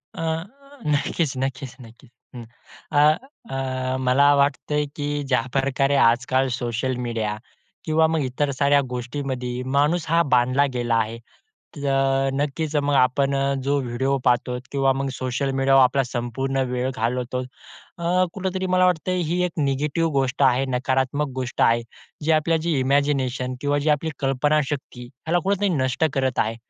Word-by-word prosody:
अ, - - -5 0.6
नक्कीच-नक्कीच-नक्कीच 135 -5 -3 0.3
हं. 120 -1 -8 0.5
अ, 145 - +3 0.6
अ, 130 -1 -2
मला 135 +3 +4
वाटतंय 145 +1 +1
की 145 -1 -3 0.3
ज्याप्रकारे 135 +3 +1
आजकाल 130 +3 +1
सोशल 120 +2 -2
मीडिया 110 -2 -2 0.5
किंवा 160 0 +3
मग 160 -1 0
इतर 140 +3 -1
साऱ्या 140 +1 +3
गोष्टींमध्ये 125 0 -4 0.2
माणूस 150 +3 +2
हा 165 +1 +4
बांधला 130 +3 +3
गेला 120 -1 0
आहे 115 0 -1 0.6
तर 135 -1 +1
नक्कीच, 150 +2 -2
मग 145 -1 +1
आपण 135 +1 +2
अ, 140 0 +1
जो 140 +1 +1
व्हिडिओ 130 +2 -1
पाहतो 125 0 +1
किंवा 135 -1 +2
मग 135 +1 -2
सोशल 130 +2 -2
मीडियावर 135 0 +4
आपला 135 +2 +2
संपूर्ण 125 +2 -3
वेळ 125 +1 -1
घालवतो, 125 +2 -2 0.6
अ, 180 +2 +1
कुठेतरी 190 -1 -3
मला 185 0 +3
वाटत 180 -1 0
ही 180 -1 0
एक 180 - -3
निगेटिव्ह 150 +3 0
गोष्ट 135 -1 0
आहे, 130 0 +3
नकारात्मक 130 +3 0
गोष्ट 130 -1 -3
आहे. 115 0 +4 0.4
जे 160 - +2
आपल्या 160 +1 +2
जे 170 - +1
इमॅजिनेशन 130 -2 0
किंवा 145 0 +1
जी 150 +2 0
आपली 150 +2 +1
कल्पनाशक्ती 135 -1 -1
ह्याला 145 +8 -2
कुठेतरी 200 +1 +1
नष्ट 130 -4 0
करत 130 -2 0
आहे. 110 +1 0
135 Hz, 140 wpm, -23 LUFS, 125-145 Hz, 0.6 s, मला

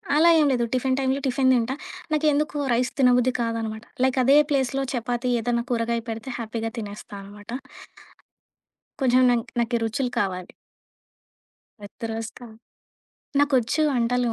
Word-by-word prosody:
అలా 325 +3 +6
ఏం 305 - +4
లేదు. 240 -2 +1
టిఫిన్ 260 +1 +1
టైములో, 265 +1 +1
టిఫిన్ 260 0 +3
తింటా. 245 +1 +1 0.4
నాకేందుకు 300 -1 +1 0.2
రైస్ 245 +1 +1
తినబుద్ధి 250 -1 +4
కాదనమాట. 225 -1 -3 0.2
లైక్ 260 0 +2
అదే 275 +4 +6
ప్లేస్‌లో, 270 -1 +1
చపాతీ 245 +1 -1
ఏదైనా 235 +1 0
కూరగాయ 235 0 0
పెడితే, 225 +3 -5
హ్యాపీగా 225 0 -3
తినేస్తానమాట. 205 -1 -9 1.5
కొంచెం 255 -1 +4
నంక్ 235 -2 -1
నాకి 235 +1 0
రుచులు 245 +3 -1
కావాలి. 185 -2 -2 1.3
వెద్దరొస్తా. 225 +3 -6 0.9
నాకొచ్చు 285 0 +2
వంటలు. 245 -1 +1
245 Hz, 115 wpm, -24 LUFS, 225-265 Hz, 1.5 s, అలా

